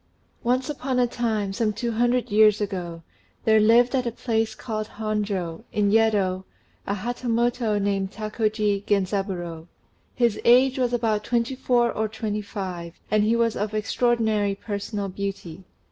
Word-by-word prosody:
Once 255 +2 +1
upon 270 -3 -2
a 250 - +4
time, 220 -5 -1
some 220 0 0
two 235 +3 -3
hundred 240 +1 +1
years 210 0 +5
ago, 180 -5 -4 0.4
there 220 -1 +5
lived 235 +4 +5
at 255 -2 +1
a - - -1
place 225 -2 -1
called 215 -3 -4
Honjô, 205 -4 -2
in 205 -1 +1
Yedo, 205 -4 +2 0.4
a 200 - 0
Hatamoto 235 0 0
named 195 -1 -1
Takoji 215 -1 -1
Genzaburô; 185 -4 -1 0.5
his 235 -4 +1
age 255 +2 +5
was 250 -1 +1
about 225 -3 0
twenty 235 +2 0
four 245 -2 +2
or 220 0 -1
twenty 215 -1 -3
five, 185 -5 -6 0.2
and 215 0 +3
he 220 +2 +2
was 230 -1 +1
of 210 +1 -2
extraordinary 215 -2 +1
personal 205 0 -4
beauty. 190 -2 -6
215 Hz, 145 wpm, -24 LUFS, 200-235 Hz, 0.5 s, years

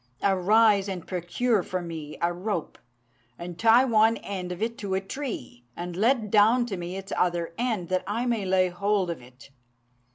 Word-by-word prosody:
Arise 200 +1 +4
and 185 -3 -5
procure 190 +5 0
for 185 +1 -3
me 160 -4 -7
a 175 +1 +2
rope, 180 -1 -4 0.6
and 175 -1 -8
tie 230 +3 +6
one 225 -2 +4
end 185 -3 -5
of 180 - -5
it 230 +1 -2
to 195 -2 -2
a - - +2
tree, 195 - -6
and 175 0 -6
let 220 +1 +1
down 225 +4 +5
to 220 -5 -4
me 175 +1 -5
its 195 0 -7
other 170 -2 0
end, 225 -7 -1
that 185 0 0
I 225 +4 -1
may 235 -4 0
lay 185 -1 +2
hold 195 0 0
of 165 - -7
it. 125 +2 -16
195 Hz, 185 wpm, -26 LUFS, 175-220 Hz, 0.6 s, tie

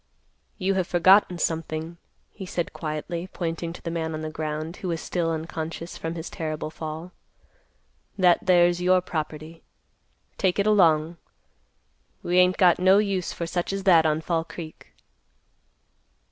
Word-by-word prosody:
"You 195 -1 0
have 185 -2 0
forgotten 180 +1 +4
something," 160 0 -3 0.3
he 190 -3 -9
said 175 -2 -3
quietly, 165 +3 -4
pointing 165 -1 -3
to - - -12
the 165 - -3
man 160 -1 -3
on 155 - -5
the 155 0 -5
ground, 155 +2 -4
who 185 - -6
was 165 -2 -2
still 170 -1 -2
unconscious 165 +1 -5
from 165 +1 -5
his 165 0 -6
terrible 155 -2 -4
fall. 160 +2 -7 1.1
"That 180 -3 +5
there's 175 -1 +3
your 185 +1 +4
property. 155 -1 -5 0.8
Take 185 -1 +1
it 200 - +1
along. 170 -6 +3 1.1
We 180 +1 +2
ain't 180 0 +4
got 180 -3 +5
no 190 +2 +5
use 195 -4 0
for 170 - -4
such 175 +2 -2
as 195 0 -3
that 170 -5 +5
on 155 +1 0
Fall 165 0 -1
Creek." 165 -1 -10
170 Hz, 150 wpm, -25 LUFS, 160-180 Hz, 1.1 s, That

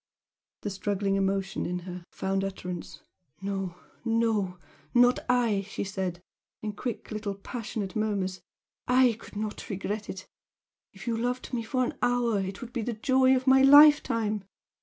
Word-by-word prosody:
The 205 - -3
struggling 195 0 -1
emotion 195 0 0
in 180 - -2
her 180 -1 -7
found 195 0 -1
utterance. 180 -5 -6 0.4
"No, 195 -2 -3 0.3
no 225 -5 +1 0.4
not 245 +1 +6
I!" 235 -5 +3
she - - -3
said, 190 -3 -4 0.4
in 215 - -2
quick 235 +3 -5
little 210 -2 -3
passionate 205 -2 -5
murmurs 200 -4 -1 0.5
"I 250 -2 +5
could - - -13
not 210 0 -4
regret 205 +2 -3
it! 185 -1 -7 0.6
If - - -12
you 235 -2 0
loved 245 +3 -2
me 240 - 0
for 255 +3 0
an - - -5
hour 245 -3 +2
it 190 0 -4
would 245 -1 -8
be 240 - -1
the 235 +2 -2
joy 260 +4 +4
of 255 0 -1
my 265 0 +6
life 290 +2 +9
time! 215 -3 -1
215 Hz, 160 wpm, -28 LUFS, 195-245 Hz, 0.6 s, life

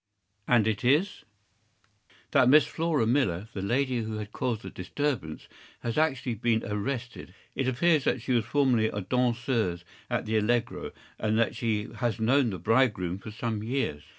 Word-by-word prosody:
” 100 +2 -46
“And 110 -3 +4
it 110 0 -1
is—‚Äù 155 +11 +2 1.1
“That 130 -4 +5
Miss 150 +3 +7
Flora 160 -7 0
Millar, 110 -6 +1
the 95 - -4
lady 125 +5 0
who 110 -1 -4
had 105 -1 -6
caused 115 -4 -2
the - - -7
disturbance, 100 - -3 0.3
has 115 -1 -3
actually 135 -6 +1
been 115 +1 0
arrested. 115 -2 -4 0.2
It 135 - -1
appears 150 +3 +2
that - - +1
she - - -3
was 120 -2 +3
formerly 125 -4 +2
a 105 -1 -3
danseuse 120 -5 0 0.3
at - - -1
the 110 +1 0
‘Allegro,’ 115 +2 0 0.3
and 110 0 0
that 115 0 +1
she 110 -2 -1
has 120 -3 -1
known 125 +3 +3
the 95 - -4
bridegroom 105 -3 +1
for 105 - -9
some 110 0 -3
years. 115 - -2
115 Hz, 170 wpm, -28 LUFS, 105-130 Hz, 1.1 s, Miss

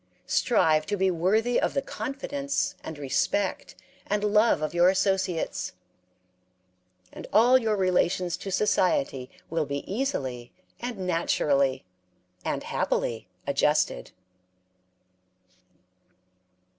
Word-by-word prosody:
Strive 160 -10 +2
to 205 0 -1
be 190 0 +2
worthy 215 +8 +1
of - - -1
the 275 - +2
confidence 275 +1 -3
and 160 - -7
respect 145 +7 -1 0.3
and 205 +1 0
love 210 -5 +3
of 155 - -2
your 175 +1 +5
associates, 190 - 0 1.4
and - - -9
all 235 +5 +6
your 220 -3 0
relations 180 -2 +1
to 195 - -7
society 180 -10 +1 0.2
will 165 -3 0
be 140 0 -4
easily 135 - -3 0.3
and 240 -2 -5
naturally 145 - +1 0.6
and - - -2
happily 115 -4 -2 0.2
adjusted. 140 - +1
185 Hz, 100 wpm, -27 LUFS, 150-210 Hz, 1.4 s, all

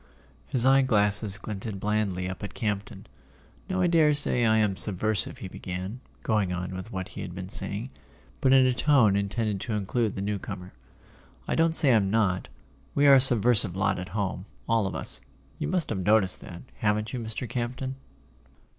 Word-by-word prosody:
His 125 -1 -2
eye 135 +1 +5
glasses 105 -4 +2
glinted 100 0 -6
blandly 100 -3 -1
up 95 - -6
at 105 - -7
Campton. 105 -4 -4 0.6
"Now 185 0 -1
I - - +3
daresay 150 -7 +4
I 110 0 +3
am 105 -3 +1
subversive," 105 +2 0
he 95 - -7
began, 95 +5 -6 0.2
going 105 -4 0
on 90 +1 -4
with 95 +5 -7
what 95 -3 -5
he - - -8
had 90 - -7
been 90 0 -7
saying, 105 +6 +1 0.5
but 130 - +2
in 130 -1 +6
a 130 - +2
tone 125 -6 +3
in¬ 100 0 -1
tended 105 -2 -2
to 115 - -4
include 105 +1 -1
the 95 - -4
newcomer. 100 -2 -5 0.7
"I - - -1
don't 165 0 +2
say 145 -6 +5
I'm 100 -4 +2
not. 100 -4 0 0.5
We 145 - +3
are 140 - +8
a 135 - +7
subversive 120 -6 +5
lot 95 0 0
at 90 - -7
home, 95 -3 -3 0.2
all 115 -3 +1
of - - -5
us—you 65 +2 -6
must 180 -4 -1
have 105 - -2
noticed 95 0 +2
that, 85 - -10
haven't 105 0 -1
you, 125 - -3
Mr. 115 +2 -5
Campton?" 125 +3 -4
105 Hz, 180 wpm, -26 LUFS, 95-120 Hz, 0.7 s, are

